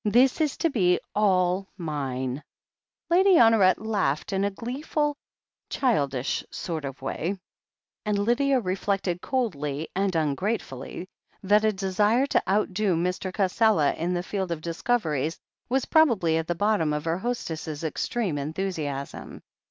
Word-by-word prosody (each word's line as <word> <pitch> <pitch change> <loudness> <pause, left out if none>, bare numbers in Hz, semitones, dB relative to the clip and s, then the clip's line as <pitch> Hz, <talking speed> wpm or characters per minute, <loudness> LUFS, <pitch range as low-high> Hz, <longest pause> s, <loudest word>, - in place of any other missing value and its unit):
This 250 +8 +3
is 300 -3 0
to 330 - +1
be 180 -8 +3
all 190 -2 +2
mine!" 135 -5 -3 0.7
Lady 375 +2 +6
Honoret 225 - +6
laughed 200 -9 -1
in 195 0 +1
a 200 - +2
gleeful, 290 +7 -2 0.5
childish 140 - 0
sort 160 -4 -4
of 135 -1 -7
way, 170 +8 -2 0.7
and 210 -2 0
Lydia 255 +6 +2
reflected 190 -2 -1
coldly 155 - -2
and 195 -1 0
ungratefully 160 - -2 0.4
that 205 +2 +4
a 215 - +4
desire 205 +5 +2
to - - +2
outdo 200 -2 +1
Mr. 180 +2 -1
Cassela 195 -4 +2
in 175 +2 -1
the 175 - -1
field 190 -2 -3
of 165 -2 -3
discoveries 165 - -1 0.3
was 265 +1 +1
probably 230 - +3
at 165 0 -2
the 175 - -1
bottom 205 -5 +1
of 150 +1 -3
her 165 +2 0
hostess's 165 -9 -4
extreme 165 +1 -2
enthusiasm. 150 -3 -4
190 Hz, 135 wpm, -26 LUFS, 160-220 Hz, 0.7 s, Lady